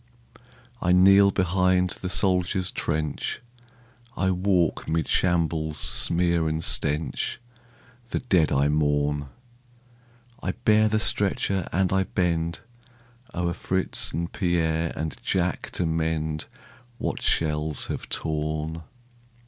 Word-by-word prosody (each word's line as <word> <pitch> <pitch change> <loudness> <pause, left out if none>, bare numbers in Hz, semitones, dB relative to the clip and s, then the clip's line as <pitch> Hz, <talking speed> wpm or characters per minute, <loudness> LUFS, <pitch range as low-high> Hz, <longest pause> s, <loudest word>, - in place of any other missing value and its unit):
I 90 -1 +2
kneel 100 +2 +6
behind 90 -1 +1
the 95 - -3
soldier's 95 0 +2
trench, 75 -2 -2 0.8
I 95 0 +1
walk 90 -2 0
'mid 80 0 0
shambles' 80 -3 0
smear 85 +2 +2
and 80 +1 -2
stench, 75 +10 0 0.7
The - - -2
dead 90 -11 +2
I 70 +1 +2
mourn; 75 -1 0 1.1
I - - -2
bear 110 -2 +3
the 110 0 +1
stretcher 100 -3 +1
and 95 0 +1
I 95 0 +2
bend 85 -3 -1 0.7
O'er 85 0 -1
Fritz 95 +1 -2
and 85 +1 -4
Pierre 80 -2 0
and 80 -1 -4
Jack 90 -1 -1
to 90 - 0
mend 80 -1 -1 0.5
What - - -3
shells 75 -2 +1
have - - -6
torn. 80 +1 -3
85 Hz, 110 wpm, -25 LUFS, 80-95 Hz, 1.1 s, kneel